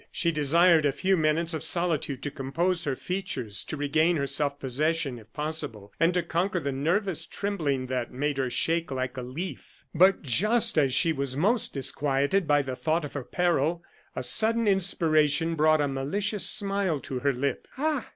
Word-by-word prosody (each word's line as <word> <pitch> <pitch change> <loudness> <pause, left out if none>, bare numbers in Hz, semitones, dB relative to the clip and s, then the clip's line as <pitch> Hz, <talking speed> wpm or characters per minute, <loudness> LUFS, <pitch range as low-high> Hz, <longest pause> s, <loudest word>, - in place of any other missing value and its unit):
She 170 -1 0
desired 165 +2 +4
a 145 - +2
few 190 +7 +1
minutes 160 +1 +1
of 160 - -4
solitude 160 -6 -1
to 145 - -3
compose 165 +6 -1
her 140 -3 -1
features, 135 - -3
to 155 - -5
regain 155 +4 +2
her 140 - -1
self 145 0 -1
possession, 140 0 -1
if 110 0 -18
possible, 145 -9 -4
and 165 +2 +4
to 180 - +1
conquer 175 +3 -1
the 140 -4 -3
nervous 170 +7 -1
trembling 155 -11 -2
that 125 -2 -3
made 145 +2 -2
her 130 -1 0
shake 165 +6 0
like 130 -1 -3
a 130 - -4
leaf. 140 +10 -8
But 185 +4 +4
just 215 - +2
as 140 -4 +3
she 165 +4 +3
was 135 -2 -1
most 210 +6 +2
disquieted 140 +6 +1
by 145 -1 +3
the 130 -1 -5
thought 160 +3 -1
of 145 - -9
her 140 - -4
peril, 170 +1 0 0.3
a 130 - -3
sudden 225 - +2
inspiration 165 -5 +2
brought 155 -1 +3
a 145 - +1
malicious 195 +10 -1
smile 195 -6 -1
to 130 - -5
her 140 +2 +1
lip. 135 +2 -3
"Ah!" 300 -2 -1
155 Hz, 180 wpm, -27 LUFS, 135-180 Hz, 0.3 s, desired